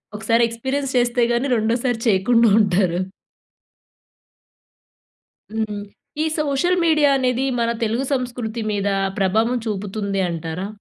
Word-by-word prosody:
ఒకసారి 230 +2 +1
ఎక్స్పీరియన్స్ 265 +4 -3
చేస్తే 240 0 +2
గాని, 245 +4 0
రెండోసారి 235 +2 0
చేయకుండా 230 +3 +4
ఉంటారు. 185 -3 +2 2.6
హ్మ్. 215 -2 -2 0.4
ఈ - - 0
సోషల్ 305 +5 +1
మీడియా 305 -3 +4
అనేది 255 -1 0 0.2
మన 230 - +1
తెలుగు 230 +5 0
సంస్కృతి 245 -3 -3
మీద 205 -1 -1 0.3
ప్రభావం 220 +6 +1
చూపుతుంది 200 -1 -2
అంటారా? 165 +3 -4
230 Hz, 105 wpm, -21 LUFS, 205-250 Hz, 2.6 s, చేయకుండా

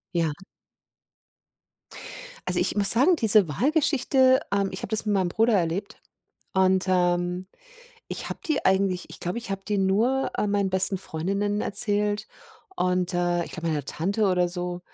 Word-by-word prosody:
Ja. 165 -2 +1 2.2
Also, - - -1
ich - - 0
muss 200 -1 +8
sagen, 275 +10 +4
diese 215 - +4
Walgeschichte, 260 - +2
ähm, 200 -1 0
ich 185 - -6
habe - - -5
das 220 0 0
mit 210 - +1
meinem 185 -2 0
Bruder 225 +5 +1
erlebt 180 +2 -2 0.5
und, 190 0 +2
ähm, 180 0 0 0.6
ich - - -4
habe - - -7
die 310 -4 -1
eigentlich 190 -1 +1
ich - - -8
glaube 180 +6 -3
ich 235 -3 -7
habe 195 0 -4
die 205 -1 -1
nur, 225 +8 +1
äh, - - 0
meinen 200 -1 0
besten 190 +1 +4
Freundinnen 200 +5 -3
erzählt 205 0 +1 0.5
und, 180 - -1
äh, 175 -1 0
ich - - -11
glaube 170 -1 -4
meiner 150 -4 -2
Tante 200 +9 -1
oder 180 -1 +1
so, 175 0 -5
195 Hz, 160 wpm, -24 LUFS, 180-210 Hz, 2.2 s, muss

